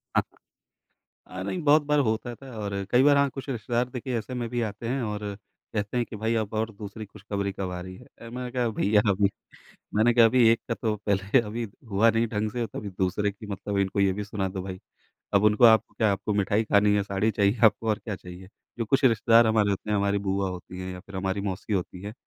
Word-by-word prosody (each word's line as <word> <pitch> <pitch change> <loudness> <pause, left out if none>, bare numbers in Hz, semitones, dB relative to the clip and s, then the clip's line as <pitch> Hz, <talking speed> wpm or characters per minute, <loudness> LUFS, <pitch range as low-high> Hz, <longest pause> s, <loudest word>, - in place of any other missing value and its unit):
हाँ। - - +5 1.1
हाँ, 95 0 -6
नहीं 175 - -3
बहुत 150 +1 +5
बार 150 0 +2
होता 120 -1 -1
था 130 -2 -11
और 100 -1 -4 0.2
कई 125 +2 +5
बार, 145 0 +6
हाँ 140 0 +3
कुछ 135 +1 -8
रिश्तेदार 120 0 -1
देखिए 125 0 -3
ऐसे 110 +4 -8
में 120 -2 -3
भी 120 0 -2
आते 110 +1 -4
हैं, 130 +3 -1
और 105 -1 -3 0.5
कहते 105 +2 -2
हैं 120 - +1
कि - - -9
भई 110 +2 -1
अब 110 -1 -2
और 110 +1 -1
दूसरी 105 +1 -8
खुशखबरी 100 -1 -4
कब 95 -1 -4
आ 90 - -4
रही 95 +1 -8
है, 125 - -14 0.2
अ, 115 - -9
मैंने 125 +1 -5
कहा 125 -2 0
भैया 105 -1 +2
अभी 100 0 +2 0.7
मैंने 115 +3 +4
कहा 115 -1 +7
अभी 120 +1 +5
एक 115 - +3
का 115 - 0
तो 110 -2 -1
पहले 100 +4 +3
अभी 115 +1 -3 0.2
हुआ 105 +3 +4
नहीं 115 +1 +1
ढंग 105 0 -2
से, 120 +1 -2
तभी 105 - -6
दूसरे 95 +2 -1
की 105 +1 -12
मतलब 100 0 -4
इनको 100 0 0
ये 100 -1 +3
भी 105 +2 -4
सुना 100 -2 -3
दो 95 0 -5
भाई। 95 -1 -6 0.6
अब 100 +1 +4
उनको, 105 +3 +4
आपको 110 -1 +5
क्या 110 -2 +2
आपको 100 +2 -2
मिठाई 100 +2 +1
खानी 105 -1 +3
है? 105 - +2
साड़ी 100 +2 0
चाहिए? 100 +2 +1
आपको 110 +1 +4
और 105 - 0
क्या 110 -3 -5
चाहिए? 90 +1 -11 0.3
जो 115 - 0
कुछ 135 +6 +2
रिश्तेदार 115 -1 +5
हमारे 110 -2 +3
होते 100 +2 -3
हैं, 105 - +2
हमारी 100 0 +1
बुआ 95 0 0
होती 90 0 -8
हैं 95 0 -5
या 90 - -8
फिर 100 +1 -11
हमारी 95 +1 -1
मौसी 100 +2 -4
होती 90 -1 -3
है, 105 +1 -6
105 Hz, 240 wpm, -26 LUFS, 100-115 Hz, 1.1 s, कहा